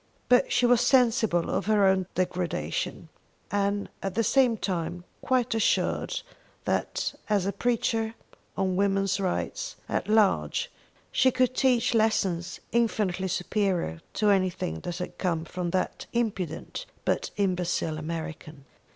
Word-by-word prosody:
But 250 0 +4
she 250 - +3
was 245 -1 +5
sensible 235 -8 +3
of - - -1
her 210 -2 +4
own 190 -1 +3
degradation, 175 - -2 0.4
and 200 0 0
at 195 -1 -3
the 230 - +2
same 245 0 +3
time 175 -3 -3 0.2
quite 250 -2 +1
assured 225 - +1 0.4
that - - -1 0.2
as 205 -3 +2
a 200 - +1
preacher 225 0 0 0.4
on 190 -1 +1
women's 195 0 +1
rights 195 - -2
at - - -1
large 205 - +2 0.4
she 260 +2 +4
could 255 0 +2
teach 250 -3 +3
lessons 195 -6 +1
infinitely 210 -5 +1
superior 180 - -1
to 210 -1 +3
anything 185 - 0
that 175 - -5
had 180 - -6
come 170 -3 0
from 180 0 -3
that 185 +2 -2
impudent 215 - -2 0.2
but - - 0
imbecile 180 -5 0
American. 155 -2 -6
195 Hz, 130 wpm, -27 LUFS, 175-225 Hz, 0.4 s, was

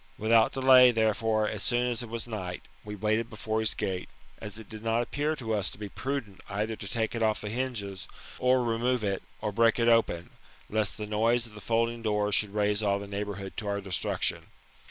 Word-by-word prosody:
Without 110 +1 +4
delay, 130 -1 +7
therefore, 110 -1 +1
as 105 -1 -3
soon 120 +2 +2
as 120 -2 -1
it 120 - -7
was 115 0 -2
night, 95 -6 -5 0.2
we 105 0 -6
waited 110 +3 0
before 110 0 -2
his 110 -1 +2
gate, 95 -1 -3 0.3
as 105 -1 -7
it 110 -2 -10
did 110 +1 -9
not 115 +1 +1
appear 150 +5 -1
lo 115 -3 -4
us 100 -3 +1
to - - -10
be 105 0 -6
pru 135 +4 -3
dent 100 -2 -17
either 105 +3 -2
to 100 - -7
take 110 0 -1
it 115 - -3
ofi" 110 -1 +1
the 105 - -4
hinges, 110 -5 -4 0.3
or 125 0 +3
remove 120 +1 0
it, 100 -2 -1 0.2
or 105 - -1
break 115 +2 +3
it 115 -1 +2
open, 115 -7 +2 0.4
lest 105 -2 0
the 105 - -4
noise 115 +3 +2
of 115 - -12
the 105 - -10
folding 115 +2 0
doors 105 -2 0
should 105 +1 +1
raise 105 0 +1
all 100 -2 +2
the 100 - -6
neighbourhood 100 -1 -5
to 110 - -3
oUr 100 0 -1
destruction. 95 -2 -1
110 Hz, 215 wpm, -29 LUFS, 105-115 Hz, 0.4 s, delay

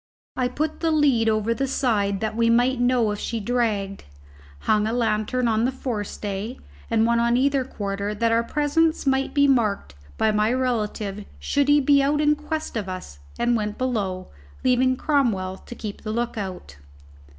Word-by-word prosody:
I 255 -1 +1
put 305 +5 -3
the 330 - +1
lead 280 -8 +3
over 215 +1 +1
the 270 +3 -2
side 205 -7 0
that 215 0 -2
we 230 0 +2
might 245 +2 +3
know 245 -3 +2
if 205 - -4
she 230 - -3
dragged, 210 -4 -1 0.6
hung 215 0 +2
a 225 - -1
lantern 235 +1 0
on 220 0 +2
the 255 - +2
forestay 215 -2 -4 0.3
and 225 -1 +3
one 235 0 +2
on 235 +1 +2
either 275 0 +2
quarter 205 -3 -4
that 230 +2 +1
our 230 0 +3
presence 300 +6 +1
might 270 +1 +1
be 285 0 +5
marked 215 - +1 0.2
by 220 - +2
my 210 +1 +2
relative 215 -5 -2
should 285 -1 0
he 290 0 +5
be 280 0 +4
out 290 +2 +1
in 300 0 +3
quest 300 0 -5
of 205 -4 -3
us, 180 - -7 0.2
and 240 0 +2
went 210 -2 -2
below, 205 -8 -2 0.3
leaving 255 0 +3
Cromwell 225 -12 0
to 240 - -11
keep 210 -3 -7
the 215 - -4
look 235 +2 -2
out. 185 - -6
235 Hz, 180 wpm, -24 LUFS, 210-260 Hz, 0.6 s, be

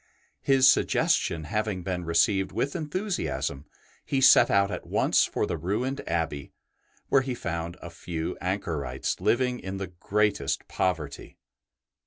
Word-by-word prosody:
His 135 -1 +5
suggestion 85 -9 +2
having 105 +2 -2
been 90 -2 -3
re 85 0 -3
ceived 95 +2 +3
with 140 - -2
enthusiasm, 165 - -3 0.4
he 135 - -1
set 135 - +7
out 100 0 +3
at 90 - -6
once - - +3
for - - -1
the 80 - -3
ruined 120 - -2
Abbey, 80 -4 -2 0.6
where 135 - +5
he 130 -1 -3
found 85 -3 -4
a 85 - -8
few 85 -1 -4
anchorites 80 -9 -2
living 125 0 +1
in 95 0 -5
the 95 - -3 0.2
greatest 105 -9 0
poverty. 80 -6 -3
95 Hz, 140 wpm, -27 LUFS, 85-125 Hz, 0.6 s, set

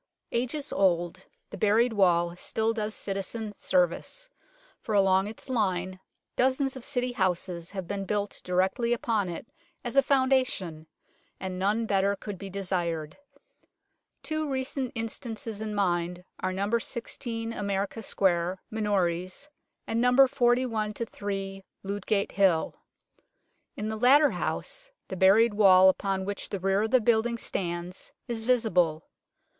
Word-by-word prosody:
Ages 255 +5 -2
old, 175 -1 +1 0.2
the - - -8
buried 225 +3 +3
wall 175 -4 +3
still 220 +5 -1
does 215 -1 -3
citizen 205 +2 -4
service, 185 - 0 0.5
for 215 - -3
along 195 0 +4
its 220 +5 -9
line 185 -6 -1 0.4
dozens 265 +1 +1
of 260 - -8
City 250 -2 -1
houses 180 -5 -1
have 190 -3 -5
been 200 -1 -3
built 205 +1 -2
directly 190 +6 +1
upon 220 -5 0
it 170 - -6 0.4
as 240 +1 -4
a 275 - +7
foundation 260 - +1 0.5
and 185 -1 -4
none 210 +4 +1
better 200 -1 +2
could 200 -2 -7
be 195 - -6
desired. 175 -5 -2 1.1
Two 310 -1 -2
recent 260 -1 -2
instances 225 -1 -4
in 215 -1 -3
mind 175 -2 0 0.2
are 185 - -1
No. 200 +5 0
16 230 -1 -4
America 200 +1 -2
Square, 185 -3 +1
Minories, 195 - -1 0.4
and 225 +1 0
No. 250 +2 +6
41 240 -5 +1
3 195 -3 -4 0.2
Ludgate 200 +1 -1
Hill. 190 -5 +2 1.0
In 215 - -3
the 220 - -3
latter 280 +6 +6
house - - -4 0.2
the - - -4
buried 205 +5 +5
wall 190 -2 +7
upon 190 0 -1
which 200 0 -4
the 200 - -3
rear 195 +2 +2
of 220 - 0
the 255 - +5
building 235 +1 +2
stands 175 -3 -4 0.2
is 225 -2 -3
visible. 180 -10 +2
205 Hz, 135 wpm, -28 LUFS, 185-235 Hz, 1.1 s, a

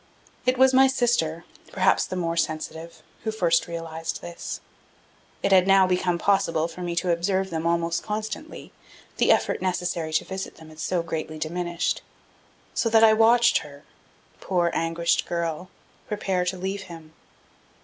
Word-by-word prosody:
It 255 0 +3
was 265 +1 +5
my 265 +1 +7
sister, 235 -11 0 0.3
perhaps - - +2
the - - -5
more 170 -2 -1
sensitive, 160 0 -3 0.2
who 220 - -1
first 180 -7 +2
realized 165 -1 -5
this. 170 0 -6 0.8
It - - +1
had 185 -1 +5
now 195 -1 +6
become 180 -1 +1
possible 170 -4 +1
for 180 - -10
me 175 -1 -3
to 175 +1 +1
observe 190 +2 0
them 165 0 -2
almost 170 0 0
constantly, 215 +8 -6 0.4
the - - +4
effort - - +1
necessary 175 -3 -2
to 155 - +1
visit 190 0 -6
them 160 -1 -14
had 155 0 -14
so 175 +1 -1
greatly 155 -1 -4
diminished; 175 +2 -2 0.7
so 230 - +1
that 225 0 +5
I 220 -1 +8
watched 235 +2 +5
her, 145 0 -12 0.6
poor, 175 -2 0
anguished 165 +1 0
girl, 170 +1 -3 0.4
prepare 190 -4 -1
to 180 +1 -2
leave 190 +2 -3
him. 160 -2 -11
175 Hz, 155 wpm, -25 LUFS, 165-195 Hz, 0.8 s, I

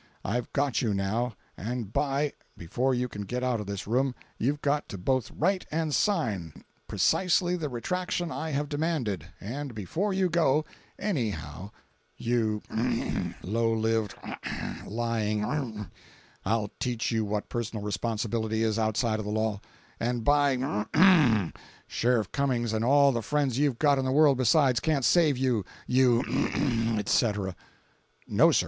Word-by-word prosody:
I've 120 +5 -2
got 140 -4 +1
you 110 -4 0
now, 110 +4 -1 0.2
and 115 0 -4
by—before 135 - -1
you 125 +1 0
can 105 -3 -7
get 125 +5 -3
out 125 -3 +1
of 105 - -6
this 100 0 -4
room 125 +4 +1 0.2
you've 145 +5 0
got 145 +1 0
to 100 - -6
both 130 +6 0
write 185 +3 0
and 160 -1 -1
sign 110 - 0 0.2
precisely 180 -1 +2
the 160 -4 -3
retraction 175 +7 -2
I 160 +1 -3
have 145 0 -1
demanded, 145 - -2
and 130 +4 -5
before 160 - -2
you 190 -1 +2
go, 155 -3 +2 0.3
anyhow—you 110 - -3 0.8
— - - -21
low 115 +4 +1
lived 110 -2 0 0.4
— - - -6
lying 110 +1 -2 0.3
—, - - -28
I'll 105 -1 0
teach 120 -2 -1
you 110 -1 +1
what 105 0 -3
personal 115 -3 -3
responsibility 110 +1 -1
is 110 0 +1
outside 110 0 +1
of 110 - -4
the - - -3
law; 110 -1 -1 0.4
and, 120 0 -1
by—, 135 - +4 0.3
Sheriff 115 -4 0
Cummings 125 -5 0
and 110 0 0
all 140 +2 +5
the 120 -2 -1
friends 140 -1 0
you've 145 -5 +2
got 145 -1 +3
in 130 - -1
the 130 - 0
world 140 -2 +5
besides, 130 0 +4
can't 145 -3 +1
save 155 -6 +4
you, 125 -5 +1 0.2
you—, 125 -2 +4 0.8
etc.! 105 -3 +1 0.7
No, - - +5
sir. - - +4
120 Hz, 145 wpm, -28 LUFS, 110-145 Hz, 0.8 s, all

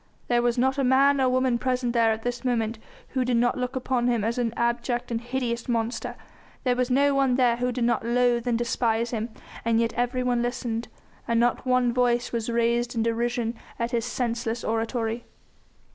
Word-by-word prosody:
There 240 -1 +3
was 240 0 +1
not 265 +3 +2
a - - +2
man 270 +2 +4
or 260 - +3
woman 255 -1 +2
present 250 -1 0
there 230 -2 +4
at 220 0 -3
this 245 +1 -3
moment 230 -3 -1 0.3
who 260 -1 0
did 245 -1 +1
not 240 +1 +2
look 250 +1 -3
upon 255 -1 0
him 235 -4 +1
as 230 +3 -1
an 235 -2 0
abject 240 +1 -1
and 230 0 -1
hideous 240 -1 -3
monster, 230 0 -1 0.5
there 250 -1 +2
was 250 0 0
no 280 +2 +3
one 270 -2 +2
there 245 -2 +3
who 250 +1 0
did 245 -1 -2
not 235 -1 +1
loathe 240 0 +2
and 235 -2 +2
despise 235 -1 0
him! 225 0 -2 0.3
And 230 0 +2
yet 230 0 +1
everyone 245 0 0
listened, 240 -1 -2 0.4
and 230 0 +2
not 240 +2 +1
one 250 -1 +3
voice 245 -1 +1
was 230 -1 -2
raised 235 +1 +1
in 225 - +1
derision 235 0 0 0.2
at 235 +1 -2
his 235 -2 0
senseless 235 -1 -2
oratory. 225 +1 -1
240 Hz, 195 wpm, -26 LUFS, 235-250 Hz, 0.5 s, man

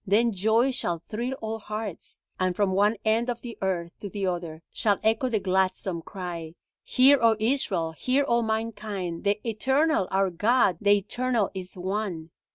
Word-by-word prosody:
Then 225 +4 +3
joy 220 +6 +2
shall 175 -9 -1
thrill 235 +9 -4
all 220 0 -3
hearts, 215 -3 -6 0.2
and 185 -1 +1
from 200 -1 +1
one 205 +3 +3
end 225 +3 +2
of 240 -1 -3
the 235 -2 -7
earth 175 -3 -1
to 200 - -6
the 200 0 -3
other 170 -3 -3
shall 205 -3 +2
echo 225 +4 +2
the 220 -3 +1
gladsome 185 -2 0
cry: 170 -3 -7 0.3
Hear, 270 +2 +5
O 230 -1 +5
Israel, 210 -9 0
hear 255 - +1
all 235 -4 +2
mankind, 215 -5 -3
the 200 +1 +2
Eternal 265 - +1
our 195 -1 +1
God, 205 0 +2
the 205 0 +5
Eternal 235 +1 -1
is 185 -1 -7
One. 185 -3 -3
205 Hz, 165 wpm, -26 LUFS, 185-230 Hz, 0.3 s, Hear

